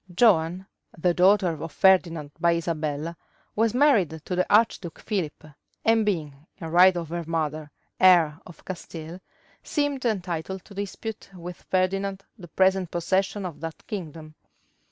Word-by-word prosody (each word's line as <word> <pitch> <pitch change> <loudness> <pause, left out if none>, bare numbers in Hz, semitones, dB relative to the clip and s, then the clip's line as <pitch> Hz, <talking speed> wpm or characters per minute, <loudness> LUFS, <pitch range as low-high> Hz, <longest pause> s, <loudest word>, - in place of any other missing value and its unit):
Joan, 180 -3 +3 0.3
the 175 +2 +2
daughter 180 -2 +3
of 165 - -5
Ferdinand 170 -6 +3
by 170 0 +3
Isabella, 160 -1 -3 0.4
was 225 +1 +1
married 215 - +3
to 180 - -2
the 185 +2 0
archduke 205 -5 +2
Philip, 180 -9 -3 0.4
and 225 0 +4
being, 155 -7 -3
in 165 -4 -7
right 180 +1 +6
of 165 -2 -4
her 170 0 -3
mother, 155 -2 -2 0.3
heir 170 -5 +5
of 175 -3 -15
Castile, 170 -1 -7 0.4
seemed 290 -3 -1
entitled 190 -4 -3
to 205 - -14
dispute 205 +2 -6
with 175 0 -9
Ferdinand 195 +1 0
the 185 -6 -12
present 190 +1 +2
possession 190 +3 -1
of 175 -4 -7
that 165 0 -7
kingdom. 160 -6 -7
180 Hz, 140 wpm, -25 LUFS, 165-195 Hz, 0.4 s, right